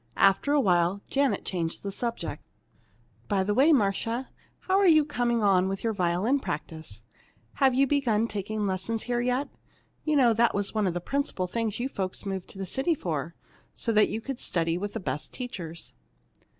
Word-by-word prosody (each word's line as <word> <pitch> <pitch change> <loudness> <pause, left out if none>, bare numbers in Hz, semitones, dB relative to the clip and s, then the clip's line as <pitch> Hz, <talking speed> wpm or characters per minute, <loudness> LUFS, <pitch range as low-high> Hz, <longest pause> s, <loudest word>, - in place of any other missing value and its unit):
After 195 +8 +4
a 295 - +4
while, 180 -3 +2
Janet 275 -1 +1
changed 170 -3 -3
the 200 - -3
subject. 230 -5 -3 0.8
"By 195 -2 +1
the 205 +2 0
way, 275 +8 +5
Marcia, 230 0 +1 0.3
how 380 +1 +2
are 400 - +5
you 310 -3 +6
coming 240 -5 0
on 190 -2 +4
with 195 0 -3
your 225 -1 +1
violin 190 +8 +1
practice? 150 - -5 0.6
Have 265 -2 +5
you 275 +2 +5
begun 245 -6 +1
taking 210 0 -3
lessons 195 +4 -2
here 240 -1 -1
yet? 250 +3 0 0.6
You 310 -1 +1
know 250 -5 +5
that 230 +1 +3
was 200 -1 0
one 215 -3 +1
of 175 - -1
the 175 - -2
principal 275 - -1
things 220 +3 -2
you 250 - 0
folks 190 -6 -4
moved 190 -2 -4
to - - -11
the 195 - -3
city 270 - 0
for, 165 - -3 0.4
so 230 - -1
that 215 -1 +4
you 225 - -3
could 270 +1 -5
study 165 -1 0
with 200 +3 -4
the 225 - -3
best 145 -5 -4
teachers." 175 -10 -6
210 Hz, 190 wpm, -27 LUFS, 185-250 Hz, 0.8 s, you